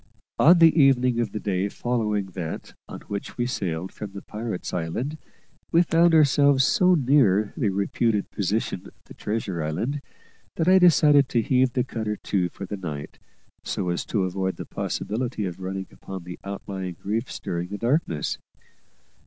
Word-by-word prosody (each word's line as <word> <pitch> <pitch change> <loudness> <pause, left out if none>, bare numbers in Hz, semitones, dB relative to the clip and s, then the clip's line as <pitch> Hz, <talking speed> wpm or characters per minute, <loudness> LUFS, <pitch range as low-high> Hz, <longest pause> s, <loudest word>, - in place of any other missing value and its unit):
On 170 +4 +7
the 165 -2 +7
evening 125 -3 +4
of 115 -4 -1
the 105 - -4
day 100 -1 -1
following 105 -5 -1
that 85 -3 -6 0.2
on - - -8
which 100 -1 -6
we 120 - 0
sailed 95 -8 -3
from 105 -2 -8
the 100 - -8
pirate's 110 -3 -5
island, 120 - -3 0.5
we 170 +1 +5
found 165 0 +4
ourselves 140 -2 +5
so 185 - +4
near 120 - +3
the 105 - 0
reputed 100 +2 0
position 100 -1 -2
of - - -18
the - - -13
treasure 105 -5 -3
island 115 - -2 0.5
that 165 - 0
I 190 +1 +7
decided 150 -6 +5
to 115 -2 +1
heave 130 0 +2
the 125 - +1
cutter 110 -3 -3
to 95 -4 -1
for 100 - -8
the 100 +2 -5
night, 75 -6 -7 0.4
so 90 - -2
as 85 - -1
to 100 -4 0
avoid 95 +1 -2
the - - -7
possibility 115 -1 -3
of 90 0 -5
running 95 +1 -4
upon 95 -2 -8
the 90 +1 -9
outlying 95 -2 -5
reef 110 +5 -1
during 85 0 -3
the 100 +2 -5
darkness. 115 - 0
105 Hz, 170 wpm, -25 LUFS, 95-130 Hz, 0.5 s, On